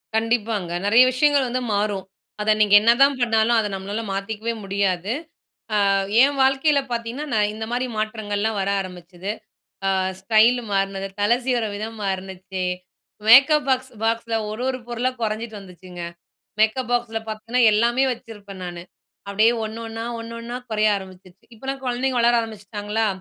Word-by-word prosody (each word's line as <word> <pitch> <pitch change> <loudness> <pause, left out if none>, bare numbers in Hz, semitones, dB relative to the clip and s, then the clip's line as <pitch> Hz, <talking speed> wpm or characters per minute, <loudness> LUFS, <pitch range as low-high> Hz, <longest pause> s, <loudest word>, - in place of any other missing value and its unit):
கண்டிப்பாங்க. 220 -5 0
நெறைய 225 +5 +7
விஷயங்கள் 280 +1 +3
வந்து 255 +1 -1
மாறும். 200 -2 -1 0.4
அத 215 +1 +3
நீங்க 205 -1 +6
என்னதான் 260 +5 +4
பண்ணாலும் 225 0 +3
அத 220 -2 +1
நம்மனால 200 +3 -4
மாத்திக்கவே 215 +3 -3
முடியாது. 195 -1 -1 0.8
ஆ - - +3 0.3
ஏன் 285 +1 +3
வாழ்க்கையில 270 +2 +3
பார்த்தீங்கன்னா, 235 +5 -4
நான் 210 -1 +2
இந்தமாரி 230 +4 -3
மாற்றங்கள்லாம் 215 -1 -2
வர 195 - -1
ஆரம்பிச்சுது. 180 0 -7 0.6
அ - - +3 0.3
ஸ்டைல் 225 +5 +4
மாறுனது. 195 0 -1
தலை 210 +4 +4
சீவிற 245 -3 +1
விதம் 220 +2 -6
மாறுனுச்சி. 190 -1 -4 0.6
மேக்கப் 275 +5 +7
பாக்ஸ் 260 0 0
பாக்ஸ்ல 230 0 0
ஒரு 215 +3 -5
ஒரு 260 -1 -2
பொருளா 240 +2 -1
குறைஞ்சிட்டு 220 0 -3
வந்துச்சுங்க. 180 -1 -12 0.6
மேக்கப் 230 +3 +2
பாக்ஸ்ல 240 -2 0
பாத்தின்னா, 220 +3 -2
எல்லாமே 235 +5 +3
வச்சிருப்பேன் 205 -5 -10
நானு. 175 -1 -6 0.5
அப்பிடியே 215 +4 +4
ஒண்ணு 220 +1 -6
ஒண்ணா 225 0 -6 0.2
ஒண்ணு 230 0 -8
ஒண்ணா 235 +1 -6
குறைய 215 0 +2
ஆரம்பிச்சுருச்சு. 190 0 -12
இப்பலாம் 270 +4 -5
குழந்தைங்க 255 +1 -1
வளர 235 +1 +4
ஆரம்பிச்சிட்டாங்களா! 215 0 -3
220 Hz, 140 wpm, -22 LUFS, 200-240 Hz, 0.8 s, நெறைய